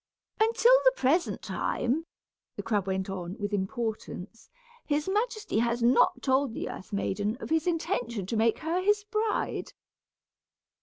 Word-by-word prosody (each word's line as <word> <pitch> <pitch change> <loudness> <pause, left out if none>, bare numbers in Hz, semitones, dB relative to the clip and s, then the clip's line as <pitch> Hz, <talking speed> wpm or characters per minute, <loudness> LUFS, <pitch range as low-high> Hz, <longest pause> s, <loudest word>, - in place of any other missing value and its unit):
"Until 465 +2 +5
the - - +6
present 325 - +1
time," 305 +7 -1 0.5
the - - -5
crab 205 -4 0
went 190 0 -1
on, 185 0 -5
with 205 -2 -3
importance, 220 0 -4 0.3
"his 295 +2 -1
majesty 425 - 0
has 235 0 0
not 245 +1 +4
told 265 -2 +2
the - - -4
earth - - -9
maiden 205 +2 -1
of - - -7
his 320 +1 +2
intention 245 - -1
to 210 - -3
make 225 0 +3
her 330 +3 -1
his 415 +2 +2
bride. 430 +1 -2
245 Hz, 145 wpm, -28 LUFS, -, 0.5 s, the